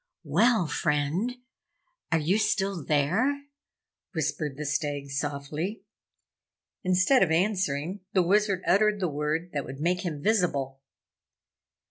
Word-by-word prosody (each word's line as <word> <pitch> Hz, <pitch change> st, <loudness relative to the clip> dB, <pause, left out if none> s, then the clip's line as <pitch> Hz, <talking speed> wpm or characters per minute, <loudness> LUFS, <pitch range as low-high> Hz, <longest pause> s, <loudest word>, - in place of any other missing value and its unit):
"Well, 200 Hz, -, +3 dB
friend! 155 Hz, +10 st, 0 dB, 0.8 s
Are 165 Hz, -, +4 dB
you 170 Hz, +7 st, +1 dB
still 195 Hz, -5 st, 0 dB
there?" 195 Hz, -, +1 dB, 0.7 s
whispered 150 Hz, -3 st, -2 dB
the 150 Hz, -, -4 dB
Stag, 145 Hz, -1 st, -2 dB
softly. 145 Hz, +7 st, -3 dB, 1.0 s
Instead 185 Hz, +8 st, +4 dB
of 185 Hz, -, +4 dB
answering, 180 Hz, -1 st, 0 dB
the 185 Hz, -, +4 dB
Wizard 195 Hz, +1 st, +2 dB
uttered 210 Hz, +2 st, +3 dB
the 185 Hz, -, 0 dB
word 155 Hz, +3 st, -2 dB
that 145 Hz, -2 st, -1 dB
would 135 Hz, +2 st, -8 dB
make 180 Hz, +3 st, +1 dB
him 160 Hz, -5 st, -3 dB
visible. 145 Hz, -11 st, 0 dB
170 Hz, 115 wpm, -27 LUFS, 145-200 Hz, 1.0 s, Are